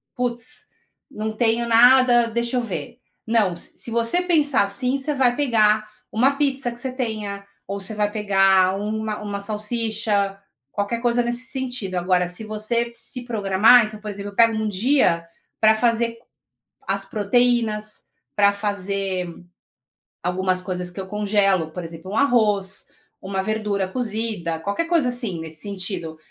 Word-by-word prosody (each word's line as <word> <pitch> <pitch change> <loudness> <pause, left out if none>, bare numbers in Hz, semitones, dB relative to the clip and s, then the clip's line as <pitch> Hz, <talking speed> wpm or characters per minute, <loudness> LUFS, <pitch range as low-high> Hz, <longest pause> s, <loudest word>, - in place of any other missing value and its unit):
Putz, 245 +3 0 0.4
não 215 -4 -5
tenho 235 +1 +1
nada, 240 +1 +6
deixa 235 +2 -2
eu - - +1
ver". 230 +3 -6 0.3
Não, 220 -5 +2
s 170 - -8
se 235 - -3
você 235 +9 +1
pensar 300 - +2
assim, 250 +7 0
você 275 +2 -2
vai 255 -3 +2
pegar 215 -6 +2 0.2
uma 265 +5 +2
pizza 270 -4 0
que 235 - -10
você 260 +1 -3
tenha, 215 -6 -4 0.2
ou 200 0 -4
você 195 +2 -3
vai 210 0 0
pegar 195 -3 +3
uma 215 +1 -3
uma 205 -1 -4
salsicha, 210 -1 -1 0.3
qualquer 205 +3 -2
coisa 240 0 +2
nesse 240 +1 0
sentido. 245 -8 -3
Agora, 180 0 +1
se 180 +5 -3
você 215 +2 -1
se 250 +1 -3
programar 220 +1 +4
então, 215 0 -9
por 210 - -6
exemplo, 205 0 -6
eu - - -20
pego 230 0 +5
um 220 0 -1
dia 205 -5 +2 0.3
para 220 0 +5
fazer 230 0 +1 0.7
as 195 0 0
proteínas, 215 +1 +1 0.3
para 200 -1 +5
fazer 195 -3 -2 0.9
algumas 185 +1 0
coisas 180 -1 -2
que 180 - -9
eu 190 - -8
congelo, 195 -4 +1
por 180 +2 -6
exemplo, 165 +3 -9
um 215 - -2
arroz, 210 -8 +2 0.3
uma 190 0 -3
verdura 210 -2 -1
cozida, 215 -6 -2
qualquer 200 - -2
coisa 330 -7 +3
assim, 235 -8 -1
nesse 160 -1 -3
sentido. 185 -5 -4
215 Hz, 155 wpm, -22 LUFS, 195-235 Hz, 0.9 s, nada